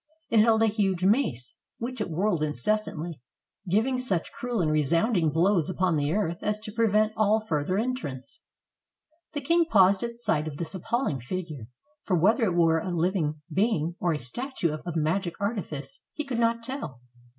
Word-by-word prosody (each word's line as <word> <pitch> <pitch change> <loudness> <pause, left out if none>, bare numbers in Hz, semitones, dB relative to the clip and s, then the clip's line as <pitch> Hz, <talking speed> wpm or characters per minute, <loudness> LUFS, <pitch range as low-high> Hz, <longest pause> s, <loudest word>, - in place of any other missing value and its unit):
It 230 - +5
held 225 0 +5
a - - +6
huge 195 -4 0
mace, 190 - +1 0.2
which 245 0 -5
it 210 - -2
whirled 175 +1 0
incessantly, 155 - -2 0.5
giving 235 +7 +2
such 195 -10 -1
cruel 245 -2 -3
and 160 -4 +1
resounding 165 - +2
blows 170 +2 +2
upon 185 -1 +1
the 145 -1 0
earth 170 -3 -1
as 210 0 0
to 215 -1 -7
prevent 215 -1 +2
all 215 0 +3
further 185 -3 -1
entrance. 210 - -4 0.9
The 290 - -3
king 335 +4 +3
paused 195 - +5
at 235 0 -4
sight 190 -10 0
of 145 -2 -6
this 170 +2 -4
appalling 190 - -1
figure, 150 -3 -5 0.3
for 185 - 0
whether 220 - +3
it 180 -4 0
were 165 -1 +4
a 185 - -4
living 165 -3 -1
being, 180 -5 +1
or 175 - +1
a - - -1
statue 175 - -2
of 155 +3 -7
magic 170 +3 0
arti 200 +1 -1
fice, 140 -4 -8
he 300 - -3
could 250 -4 -3
not 230 0 +1
tell. 235 - -4
190 Hz, 175 wpm, -27 LUFS, 160-225 Hz, 0.9 s, a